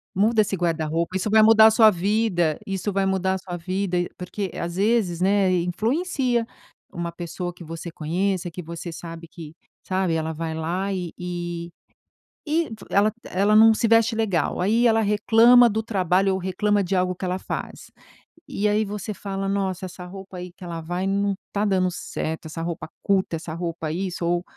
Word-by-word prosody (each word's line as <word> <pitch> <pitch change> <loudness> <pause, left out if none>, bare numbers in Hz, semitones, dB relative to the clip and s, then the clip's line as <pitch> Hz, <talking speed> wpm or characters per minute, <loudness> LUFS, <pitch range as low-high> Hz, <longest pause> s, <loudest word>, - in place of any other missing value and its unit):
"Muda 215 +3 +3
esse 200 -1 -1
guarda-roupa, 165 +1 -1
isso 200 +3 -2
vai 220 +1 +6
mudar 220 0 +8
a - - +5
sua 220 -1 +6
vida, 185 -4 +1
isso 195 +1 -3
vai 195 0 +1
mudar 190 0 +1
a - - -1
sua 180 -1 -6
vida.", 185 +1 -2 0.2
porque 185 +1 -4
às 170 +1 -4
vezes, 200 -5 +1
né, 195 -1 +3
influencia 235 - 0 0.5
uma 170 0 -4
pessoa 175 +1 -5
que 175 - -12
você 165 +1 -7
conheça, 175 +3 -1
que 180 +1 -7
você 170 +1 -7
sabe 165 0 -8
que, 160 -1 -11 0.3
sabe, 185 -2 0
ela 160 0 -1
vai 160 0 -4
lá 180 +5 -2
e 180 -3 -4
e 175 -1 -5 0.8
e 320 +2 +1 0.2
ela 210 +2 +3
ela 200 +3 +2
não 225 +1 +8
se 230 - +1
veste 230 0 +4
legal, 205 -7 0
aí 225 +6 +3
ela 225 0 +3
reclama 230 +3 +6
do 220 +1 -1
trabalho 190 -2 +1
ou - - 0
reclama 200 +2 +1
de 190 +2 -1
algo 180 0 0
que 185 - -10
ela 185 +1 -2
faz. - - -6 0.6
E 210 +1 -1
aí 210 +1 +2
você 210 +1 -5
fala: 195 0 -4
"Nossa, 190 -2 -1
essa 180 0 -9
roupa 190 0 -10
aí 180 0 -7
que 185 - -14
ela 170 -2 -5
vai 175 +3 -3
não 200 0 +1
está 205 +1 -1
dando 185 -2 +2
certo, 160 -2 -5
essa 165 +1 -6
roupa 170 -1 -5
curta, 190 -4 +1
essa 160 0 -6
roupa 165 -2 -4
isso 180 0 -3
ou 175 +1 +1
185 Hz, 185 wpm, -24 LUFS, 170-205 Hz, 0.8 s, mudar